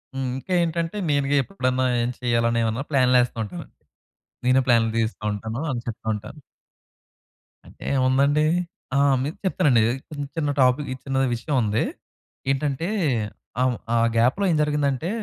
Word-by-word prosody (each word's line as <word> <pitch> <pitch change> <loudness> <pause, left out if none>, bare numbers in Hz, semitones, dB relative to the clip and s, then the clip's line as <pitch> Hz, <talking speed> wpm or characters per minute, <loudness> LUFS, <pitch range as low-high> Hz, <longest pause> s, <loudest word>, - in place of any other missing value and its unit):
హ్మ్, 135 -1 -2
ఇంకా 185 +7 -5
ఏంటంటే 170 +3 -1
నేను‌గా 140 0 +1
ఎప్పుడన్నా 130 -7 -1 0.2
ఏం 120 - 0
చెయ్యాలి? 120 -2 +1
అనేమన్నా 115 +2 0
ప్లాన్లేస్తూ 125 -3 +3
ఉంటాను. 90 -3 -8 0.8
నేనే 130 +1 +5
ప్లాన్లు 115 -2 +4
దీస్తాఉంటాను 110 +1 -2
అని 120 - -2
చెప్తా 115 -1 -6
ఉంటాను. 105 +8 -8 1.3
అంటే - - -14
ఏముందండి? 140 +4 +3 0.5
ఆ! - - +3 0.3
మీకు 150 +4 -4
చెప్తానండి. 145 -11 +3 0.3
చిన్న, 145 -2 -5
చిన్న 145 -2 0
టాపిక్ 130 +3 +3
ఈ - - -5
చిన్నది 135 -1 +1
విషయం 140 +5 -3
ఉంది. 105 0 +1 0.7
ఏంటంటే 140 +4 -1 0.7
ఆహ్, 130 -1 +3 0.2
ఆ - - +4 0.2
గ్యాప్‌లో 125 - +3
ఏం - - +2
జరిగిందంటే 150 +1 0
130 Hz, 135 wpm, -24 LUFS, 115-145 Hz, 1.3 s, నేనే